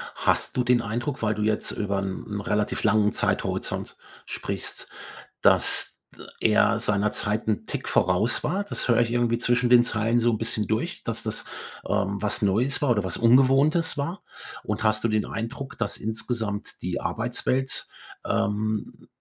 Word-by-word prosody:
Hast - - +1
du 125 - +1
den 120 0 +3
Eindruck, 120 +5 -3
weil 110 -1 0
du 105 - -4
jetzt 105 0 0
über 100 -1 -2
'n 95 -1 -4
'n 105 -1 -5
relativ 105 +1 -1
langen 105 0 +3
Zeithorizont - - -2 0.3
sprichst, - - -5 0.5
dass - - +3
ä - - -12 0.2
er - - +3
seiner 105 0 +1
Zeit 105 +1 -1
'n 105 - -1
Tick - - -5
voraus 100 +6 +2
war? 190 +6 0
Das 205 - -1
höre 120 -1 +4
ich 115 -1 0
irgendwie 120 -1 +1
zwischen 120 0 +1
den 120 -1 +7
Zeilen 115 +1 +1
so 120 +1 +3
'n 110 - 0
bisschen 110 -1 -2
durch, 110 0 -2
dass - - -3
das, - - -1 0.4
ähm, 100 +1 -1
was 105 -1 +1
Neues 110 +7 +1
war 145 -4 +2
oder 105 -4 +1
was 95 - -2
Ungewohntes 135 +7 +4
war? 170 +7 -4 0.4
Und - - -3
hast 110 0 +2
du 115 - +2
den 110 -1 +1
Eindruck, 125 +4 -6
dass 115 -3 -1
insgesamt 110 -1 -4
die - - -3
Arbeitswelt, 135 +1 -1 0.4
ähm, 105 +1 -1
m - - -20
115 Hz, 170 wpm, -25 LUFS, 105-125 Hz, 0.5 s, den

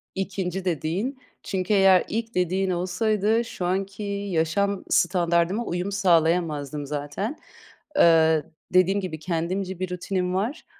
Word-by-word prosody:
2'nci 190 -1 -3
dediğin. 180 - -2 0.3
Çünkü 190 +1 -1
eğer 195 -2 +6
ilk 230 -1 -3
dediğin 185 +2 +1
olsaydı 210 +5 +1
şu 180 - -5
anki 195 +3 -2 0.3
yaşam 185 +5 0
standardıma 175 +4 +2
uyum 180 +2 -2
sağlayamazdım 165 -6 +1
zaten. 145 - -4 0.6
Eee, 160 -2 +5 0.3
dediğim 185 +2 +4
gibi 160 -5 -5
kendimce 180 +3 -3
bir 185 -1 -3
rutinim 180 0 -2
var 220 - -2
185 Hz, 115 wpm, -25 LUFS, 170-195 Hz, 0.6 s, eğer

